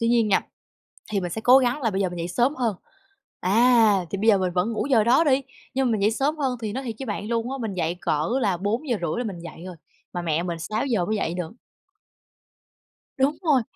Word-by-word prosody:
Tuy 230 - +1
nhiên 230 -2 +3
nha, 195 - +4 0.7
thì 200 - +1
mình 175 -1 -3
sẽ 220 - -4
cố 250 +3 +7
gắng 255 +2 +1
là 225 - +1
bây 195 +1 -1
giờ 185 - +1
mình 175 - -7
dậy 170 +1 -3
sớm 240 - +1
hơn. 235 -5 0 0.6
À! 220 -1 +4
Thì 200 - -2
bây 215 +3 -1
giờ 200 - +6
mình 185 -2 -1
vẫn 185 +6 0
ngủ 225 - -2
giờ 225 -5 +4
đó 255 +8 +4
đi, 275 -2 +3 0.3
nhưng 265 -1 +1
mà - - +1
mình 210 -3 0
dậy 210 - +3
sớm 285 +7 0
hơn 260 -4 -1
thì 215 -2 -3
nói 265 - -4
thiệt 230 -4 -5
với 265 - -5
bạn 205 -1 -4
luôn 235 +2 -1
á, 270 - -3
mình 220 -4 -3
dậy 170 -1 -1
cỡ 150 +2 0
là 195 -5 +1
4:30 210 - -1
là 245 - -1
mình 195 -6 -5
dậy 170 0 -10
rồi, 185 - -8 0.4
mà 175 - -2
mẹ 165 0 0
mình 170 -2 -4
6:00 215 +1 -1
mới 215 - -1
dậy 170 -5 -1
được. 175 0 -4 1.7
Đúng 280 +3 +2
rồi! 285 -7 +3
220 Hz, 245 wpm, -24 LUFS, 185-250 Hz, 1.7 s, cố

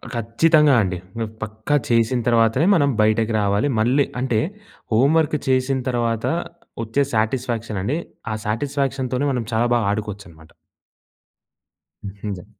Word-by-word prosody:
ఖచ్చితంగా 145 +6 +3
అండి. 90 -2 -1 0.5
పక్కా 110 +6 -2
చేసిన 115 +1 +2
తర్వాతనే 115 +4 +3
మనం 145 -5 +3
బయటకి 110 +1 +2
రావాలి. 100 +6 +1
మళ్ళీ 130 +5 +3 0.2
అంటే 125 -4 +1 0.5
హోమ్ 135 +8 +4
వర్క్ 155 -1 0
చేసిన 130 0 +1
తర్వాత 115 -2 -1 0.6
వచ్చే 115 +6 +1
సాటిస్ఫాక్షనండి 115 0 -1 0.3
ఆ - - -1
సాటిస్ఫాక్షన్‌తొనే 135 +2 -1
మనం 125 -3 -1
చాలా 115 +2 +2
బాగా 115 -3 +1
ఆడుకోవచ్చనమాట. 100 -6 -6 1.5
హుహు. 100 -2 -6
115 Hz, 110 wpm, -21 LUFS, 110-135 Hz, 1.5 s, హోమ్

